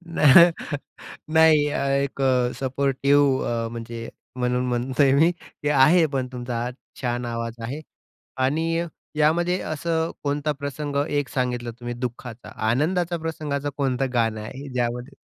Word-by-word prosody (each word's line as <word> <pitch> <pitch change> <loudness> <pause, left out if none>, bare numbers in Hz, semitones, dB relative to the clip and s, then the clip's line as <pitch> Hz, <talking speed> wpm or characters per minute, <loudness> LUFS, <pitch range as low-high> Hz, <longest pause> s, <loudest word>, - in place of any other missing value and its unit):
नाह 150 +1 +6 0.6
नाही 160 -2 +6 0.4
एक 140 0 -4
अ, 125 -2 +2
सपोर्टिव्ह 140 +1 +2
अ, 115 -1 -1
म्हणजे 115 0 -6 0.3
म्हणून 125 0 0
म्हणतोय 130 +3 +2
मी, 160 +5 +5 0.3
ते 145 - +1
आहे 150 +5 +5
पण 130 -2 -1
तुमचा 120 -1 -4
आवाज 125 +1 -3 0.3
छान 120 -1 -2
आवाज 115 0 -4
आहे. 140 +7 -5 0.6
आणि 145 +6 +1 0.5
यामध्ये 170 +4 +2
असं 160 +1 -1
कोणता 145 +1 0
प्रसंग 140 0 -4
एक 145 -2 -1
सांगितलं 125 -2 -2
तुम्ही 120 0 -4
दुःखाचा, 120 -1 -6 0.2
आनंदाचा 170 +7 +1
प्रसंगाचं 150 -3 -3
कोणतं 135 -1 0
गाणं 115 -2 +1
आहे? 135 +6 -8
ज्यामध्ये 125 +2 -2
135 Hz, 130 wpm, -24 LUFS, 125-150 Hz, 0.6 s, नाह